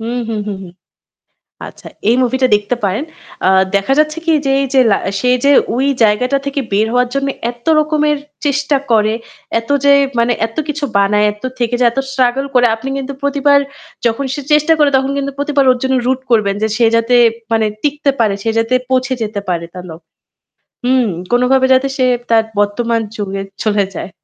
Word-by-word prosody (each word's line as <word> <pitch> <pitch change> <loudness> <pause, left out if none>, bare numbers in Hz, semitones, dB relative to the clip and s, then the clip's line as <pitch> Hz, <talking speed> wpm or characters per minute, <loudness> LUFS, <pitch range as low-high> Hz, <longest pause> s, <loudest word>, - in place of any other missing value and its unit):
হুম, 235 +2 -3
হুম, 220 -2 -2
হুম, 205 -2 -4
হুম। 175 -2 -11 0.9
আচ্ছা, - - -13 0.2
এই 240 - +3
মুভিটা 255 +1 +1
দেখতে 210 +4 0
পারেন। 200 +8 -1 0.4
আ - - +5 0.3
দেখা 200 +7 +1
যাচ্ছে 305 +1 +1
কী, 330 - +3
যে - - +1
এই 275 - 0
যে 265 - +6
লা 200 - +4 0.2
সে 250 - 0 0.2
যে 280 - +5 0.2
ওই 265 +3 0 0.2
জায়গাটা 250 +6 +2
থেকে 280 0 -2
বের 215 +2 +2
হওয়ার 250 0 +2
জন্য 275 0 -1 0.2
এত্ত 240 0 -17
রকমের 300 -1 +1 0.3
চেষ্টা 285 0 +1
করে, 215 -1 +3 0.5
এত 230 - -16
যে 285 - +6 0.3
মানে 235 +1 +2
এত্ত 225 - -15
কিছু 300 0 -3
বানায়, 205 +1 +3
এত্ত 210 +3 -18
থেকে 240 -1 -1
যে - - +4
এত 235 - -6
স্ট্রাগল 265 0 +1
করে। 245 -1 +5
আপনি 260 +4 -7
কিন্তু 275 0 -5
প্রতিবার 280 0 +3 0.5
যখন 235 +4 0
সে 290 - -4
চেষ্টা 300 +2 +4
করে, 295 -1 +4
তখন 265 +1 0
কিন্তু 280 0 -3
প্রতিবার 285 -1 +1
ওর 250 - +2
জন্য 265 0 0
root 260 0 0
করবেন 210 -4 +2
যে - - +3
সে 240 - +3
যাতে 230 +2 +1 0.4
মানে 220 -1 +2 0.2
টিকতে 290 -1 0
পারে, 215 -3 +2
সে 225 - +1
যাতে 225 +2 0 0.2
পৌঁছে 260 0 +1
যেতে 210 -2 -3
পারে 170 -2 -1
তার 180 -1 -8
লক 160 +1 -10 0.9
হুম। 255 -1 +2 0.2
কোনোভাবে 250 +2 +3
যাতে 260 +1 +2
সে 255 - +2 0.2
তার 225 -1 +4 0.2
বর্তমান 230 +3 0 0.2
যুগে 195 -2 -4 0.2
চলে 210 -2 +1
যায়। - - -5
250 Hz, 190 wpm, -15 LUFS, 220-275 Hz, 0.9 s, যে